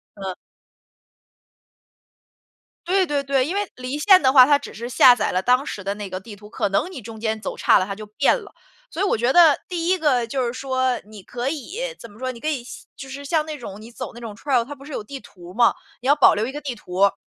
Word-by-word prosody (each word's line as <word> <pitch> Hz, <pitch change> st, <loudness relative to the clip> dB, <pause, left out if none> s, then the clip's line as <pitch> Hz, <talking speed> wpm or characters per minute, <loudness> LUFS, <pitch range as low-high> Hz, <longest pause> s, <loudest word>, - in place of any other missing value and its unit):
嗯。 190 Hz, -2 st, -5 dB, 2.5 s
对 375 Hz, 0 st, +3 dB
对 290 Hz, -3 st, -1 dB
对， 270 Hz, -2 st, +1 dB
因 330 Hz, -, -3 dB
为 405 Hz, 0 st, -2 dB
离 255 Hz, +3 st, -5 dB
线 370 Hz, +3 st, +6 dB
的 260 Hz, -, +4 dB
话 260 Hz, -2 st, +9 dB
它 290 Hz, +1 st, +4 dB
只 285 Hz, -, -10 dB
是 235 Hz, +2 st, -6 dB
下 250 Hz, 0 st, +7 dB
载 -, -, -1 dB
了 185 Hz, -, +1 dB
当 250 Hz, +6 st, +2 dB
时 200 Hz, -, -6 dB
的 195 Hz, +1 st, -2 dB
那 205 Hz, -1 st, -7 dB
个 185 Hz, 0 st, -5 dB
地 205 Hz, 0 st, -11 dB
图， 210 Hz, +1 st, -14 dB
可 205 Hz, -, -1 dB
能 200 Hz, -, 0 dB
你 355 Hz, -9 st, -8 dB
中 220 Hz, 0 st, -10 dB
间 220 Hz, -1 st, -2 dB
走 -, -, -5 dB
差 -, -, +5 dB
了 185 Hz, -, -1 dB
它 200 Hz, -, -5 dB
就 215 Hz, +2 st, -9 dB
变 215 Hz, +7 st, +2 dB
了。 405 Hz, -, -14 dB, 0.4 s
所 380 Hz, -3 st, -3 dB
以 -, -, +3 dB
我 390 Hz, -, +1 dB
觉 240 Hz, +4 st, +1 dB
得 330 Hz, -4 st, +6 dB
第 345 Hz, -1 st, -2 dB
1 375 Hz, -, +3 dB
个 275 Hz, -8 st, +2 dB
就 255 Hz, +2 st, -2 dB
是 235 Hz, -, -3 dB
说 260 Hz, -1 st, -1 dB
你 210 Hz, -1 st, -12 dB
可 245 Hz, +6 st, -4 dB
以 395 Hz, -, -5 dB
怎 235 Hz, -, -11 dB
么 205 Hz, -, -17 dB
说 255 Hz, +1 st, -3 dB
你 235 Hz, -, -12 dB
可 305 Hz, -, -5 dB
以 285 Hz, -6 st, -1 dB, 0.3 s
就 270 Hz, -, -10 dB
是 280 Hz, +2 st, -8 dB
像 310 Hz, +1 st, +1 dB
那 310 Hz, -1 st, -6 dB
种 205 Hz, -5 st, -9 dB
你 225 Hz, +2 st, -12 dB
走 250 Hz, +1 st, -7 dB
那 235 Hz, -, -11 dB
种 225 Hz, -3 st, -7 dB
trail 250 Hz, +2 st, 0 dB
它 275 Hz, +5 st, -8 dB
不 275 Hz, -1 st, -14 dB
是 300 Hz, -, -9 dB
有 -, -, -4 dB
地 270 Hz, +5 st, -8 dB
图 180 Hz, -5 st, -14 dB
嘛， 235 Hz, +3 st, +4 dB, 0.3 s
你 255 Hz, -, -4 dB
要 285 Hz, -, +6 dB
保 295 Hz, -, +6 dB
留 215 Hz, +2 st, -1 dB
一 265 Hz, -, -6 dB
个 295 Hz, -, -6 dB
地 280 Hz, -3 st, -4 dB
图 215 Hz, -6 st, -12 dB
儿。 200 Hz, -, +5 dB
255 Hz, 290 characters per minute, -22 LUFS, 220-290 Hz, 2.5 s, 话